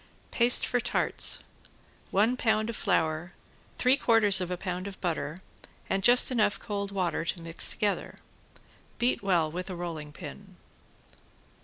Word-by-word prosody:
~PASTE 240 0 +4
FOR 245 - 0
TARTS~ - - +1 0.7
One 215 +6 +2
pound 220 -2 0
of - - -9
flour, 160 0 -1 0.4
three 255 +1 +4
quarters 215 -7 +5
of 180 - -3
a 180 - -3
pound 180 +1 -4
of 195 - -9
butter 165 -1 -3 0.5
and 195 - +1
just 245 +5 +5
enough 210 -4 +1
cold 200 -2 -4
water 180 -4 -1
to 170 +2 -3
mix 165 0 0
together. 205 -3 -2 0.8
Beat 245 +1 +1
well 175 -6 +1
with 180 +3 -5
a 185 - -5
rolling 165 -4 -6
pin. 185 +5 -11
195 Hz, 145 wpm, -28 LUFS, 170-215 Hz, 0.8 s, quarters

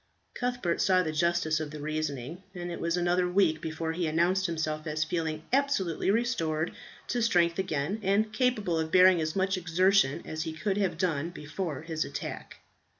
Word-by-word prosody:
Cuthbert 245 -8 -1
saw 185 -1 +4
the 160 - -2
justice 160 0 +1
of 155 -1 -4
the 150 0 -8
reasoning, 155 +1 -3
and 175 0 -5
it 170 - -6
was 170 +1 0
another 180 +1 +2
week 180 -4 +2
before 160 0 -3
he 170 0 -1
announced 175 +4 +2
himself 155 -1 -3
as 155 0 0
feeling 160 -1 -2
absolutely 265 - +1
restored 175 -9 0 0.4
to 245 - 0
strength 175 -6 +2
again, 185 +2 -1
and 210 +2 +1
capable 215 -8 +1
of 160 0 -2
bearing 185 -2 +6
as 155 0 -2
much 190 0 +1
exertion 180 -3 +2
as 155 0 -4
he 160 -1 -3
could 195 +5 -1
have 195 -5 0
done 165 -4 0
before 150 -2 -5
his 160 -1 -2
attack. - - -6
170 Hz, 175 wpm, -29 LUFS, 155-190 Hz, 0.4 s, bearing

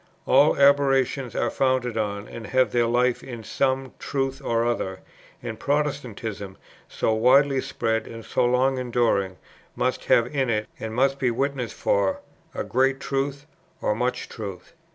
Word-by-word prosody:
All 140 +3 +5
aberrations 135 -3 +3
are - - 0
founded 130 -3 +1
on, 105 -2 -2
and 115 -2 -8
have 130 0 +2
their 120 -1 +2
life 125 +1 +2
in, 120 -3 -8
some 130 +3 -1
truth 135 -1 -2
or 115 0 +1
other 95 -6 -2 0.4
and 115 -2 -5
Protestantism, 120 -9 -2 0.3
so 110 - 0
widely 130 +4 +4
spread 110 -1 -2
and 115 -1 -9
so - - 0
long 130 +2 +2
enduring, 115 -7 0 0.4
must - - -1
have 115 - +4
in 135 -3 +1
it, 110 -1 0
and 110 0 -5
must 135 +2 +2
be 130 - +2
witness 130 0 -1
for, 100 -1 0 0.4
a - - -2
great 135 +2 +1
truth 140 +1 -2 0.3
or - - +1
much 125 +3 -2
truth. 100 - -8
125 Hz, 155 wpm, -24 LUFS, 110-135 Hz, 0.4 s, All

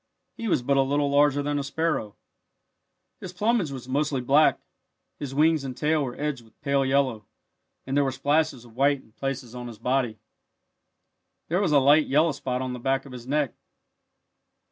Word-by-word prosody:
He 230 -2 -5
was 150 - +1
but 140 +2 +2
a - - +5
little 140 +1 +1
larger 145 0 +3
than 145 0 -1
a - - -2
sparrow. 140 -7 -2 1.0
His 180 - -8
plumage 210 -2 +1
was 130 -3 -8
mostly 140 +1 0
black. 140 +5 +4 0.6
His 135 -2 -5
wings 155 0 +3
and 130 -2 -6
tail 155 0 +1
were 125 -2 -6
edged 145 -4 -2
with 110 -1 -24
pale 140 -1 +1
yellow, 130 -6 0 0.6
and 135 - -3
there 145 - +4
were 135 - 0
splashes 140 -1 0
of 115 -2 -17
white 140 +1 +2
in - - -24
places 130 -1 -5
on 125 -1 -7
his 115 -2 -9
body. 125 -1 0 1.3
There 180 +4 +1
was 185 -6 +1
a 145 - +5
light 145 +3 +5
yellow 155 +4 +3
spot 130 -2 -3
on 130 -1 -3
the 125 - -6
back 135 +2 0
of 135 - -11
his 125 -1 -9
neck. 145 -1 0
140 Hz, 190 wpm, -26 LUFS, 130-150 Hz, 1.3 s, a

